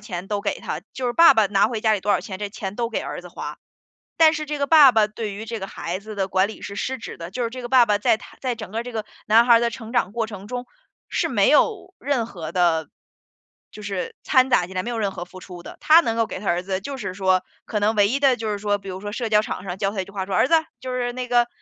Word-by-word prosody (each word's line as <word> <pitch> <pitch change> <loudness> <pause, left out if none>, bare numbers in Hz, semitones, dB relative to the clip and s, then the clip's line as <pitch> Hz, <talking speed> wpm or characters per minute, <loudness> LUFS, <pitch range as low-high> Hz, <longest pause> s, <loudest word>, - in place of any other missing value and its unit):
钱 185 -4 -6
都 205 0 -2
给 - - -2
他， - - -4
就 255 -1 -3
是 240 - 0
爸 335 -2 +7
爸 220 -2 +4
拿 200 +1 +3
回 225 -3 -3
家 220 -1 +3
里 205 - 0
多 205 - -1
少 - - +3
钱， 195 -5 -7
这 205 0 -3
钱 200 -2 -6
都 235 0 -2
给 230 - -2
儿 - - -6
子 - - -12
花。 - - -7 0.6
但 320 -1 +6
是 310 -1 -3
这 300 0 -3
个 280 - 0
爸 295 -5 +8
爸 220 -2 +4
对 215 0 -5
于 215 - -7
这 225 0 -5
个 195 - -5
孩 180 -1 -5
子 215 +1 -9
的 195 -1 -1
管 190 +1 +2
理 220 - -10
是 200 - -7
失 260 +5 -3
职 - - -8
的， 170 +1 -8
就 245 +5 -3
是 230 - -1
这 255 +1 -7
个 240 - -5
爸 250 -2 +6
爸 205 -1 +2
在 215 - +3
他 - - -15
在 255 -2 -1
整 220 -4 -8
个 225 +3 -3
这 245 0 -8
个 220 -1 -3 0.2
男 225 +2 +6
孩 235 - +7
儿 230 - +5
的 235 - +1
成 230 -1 -9
长 200 -5 +1
过 230 -1 -1
程 200 -2 -9
中， 245 +2 -5 0.4
是 - - 0
没 - - +3
有 405 -4 +2
任 260 -4 -1
何 170 -8 -7
的 170 -3 +2 0.8
就 210 - -10
是 200 -3 -4
掺 260 0 +3
杂 180 - +3
进 185 - -11
来， 185 - 0
没 240 - -4
有 230 - -3
任 200 -2 0
何 175 - -6
付 185 +1 -13
出 180 -2 -10
的。 - - -11
他 320 +2 +7
能 230 -9 -1
够 230 - +2
给 - - -6
他 200 - -9
儿 175 0 +1
子 190 0 -3
就 275 +7 -6
是 200 -7 -5
说， 185 -1 +2 0.2
可 210 -2 -2
能 215 +2 +2
唯 205 -1 +5
一 270 +6 -1
的 270 -3 +4
就 220 -1 -4
是 205 - -3
说， 205 0 0
比 195 - -11
如 185 0 -6
说 205 +1 -5
社 230 -1 -3
交 210 0 +5
场 190 - -5
上 185 -1 -5
教 195 -1 0
他 200 - -3
一 - - -7
句 200 - -15
话， 190 -2 -4
说： 190 - -3
“儿 - - +4
子， 330 - +2 0.2
就 255 -1 -6
是 245 -1 -1
那 255 0 -4
个， 240 -1 +3
215 Hz, 330 characters per minute, -23 LUFS, 195-245 Hz, 0.8 s, 爸